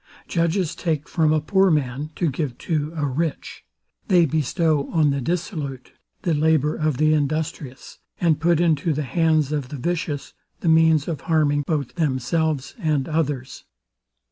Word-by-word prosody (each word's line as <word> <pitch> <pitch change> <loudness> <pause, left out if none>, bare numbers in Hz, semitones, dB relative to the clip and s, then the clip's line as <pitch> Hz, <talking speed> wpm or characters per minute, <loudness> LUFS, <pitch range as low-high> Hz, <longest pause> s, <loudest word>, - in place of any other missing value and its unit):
Judges 170 0 0
take 155 -4 -2
from 160 -2 +2
a 155 - +3
poor 190 +5 +3
man 145 -2 -1
to 170 -5 0
give 135 -3 -3
to 155 -2 -2
a 150 -2 -1
rich; 150 +4 -3 0.4
they 180 -3 +5
bestow 155 0 0
on 155 -4 +2
the 140 0 -1
dissolute 150 - -4 0.3
the 175 -4 +1
labour 155 -1 +2
of 155 -4 -1
the 155 +1 +3
industrious; 150 -2 -3 0.2
and 165 -4 +2
put 170 -1 +3
into 165 -2 +2
the 150 +1 -2
hands 155 0 +1
of 145 -4 -2
the 145 - -6
vicious 150 0 -3 0.3
the 170 - +1
means 160 -2 +4
of 165 -4 -3
harming 150 -3 +2
both 145 -6 -1
themselves 150 -1 -1
and 155 -7 0
others. 145 -5 -2
155 Hz, 155 wpm, -23 LUFS, 145-165 Hz, 0.4 s, they